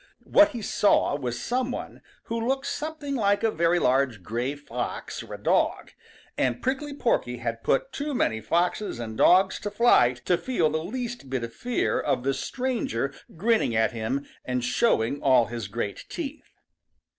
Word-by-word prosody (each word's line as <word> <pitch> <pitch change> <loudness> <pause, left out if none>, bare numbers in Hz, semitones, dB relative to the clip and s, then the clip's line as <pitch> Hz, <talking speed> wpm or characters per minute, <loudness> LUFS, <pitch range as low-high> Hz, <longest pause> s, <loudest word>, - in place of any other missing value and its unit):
What 305 0 +6
he 235 -3 -5
saw 200 -7 +3
was 125 -4 -3
some 250 +1 -1
one 250 - -6 0.2
who 230 0 -3
looked 270 +1 0
something 295 0 -4
like 205 -5 +2
a 225 - +3
very 170 0 +2
large 130 - +1
gray 120 +7 -2
fox 135 -4 -5
or - - -8
a - - -14
dog, - - +1 0.5
and 125 -2 +1
Prickly 275 +3 -2
Porky 125 - 0
had 115 -1 -4
put 135 - 0
too 290 0 -3
many 110 - +1
foxes 175 - 0
and 115 -2 -5
dogs 190 - +5
to 205 - -4
flight 125 - +4
to 180 - +2
feel 175 -12 +1
the 155 +1 -1
least 240 - -5
bit 130 -2 -2
of 115 - -6
fear 245 -1 0
of - - 0
the 135 +1 +1
stranger 145 - -2 0.2
grinning 215 - +2
at 110 -1 +3
him 120 +5 -2 0.2
and 125 -1 -2
showing 125 - +1
all 130 -4 +5
his 115 -3 -5
great 105 -1 -4
teeth. 305 -2 -6
155 Hz, 170 wpm, -26 LUFS, -, 0.5 s, What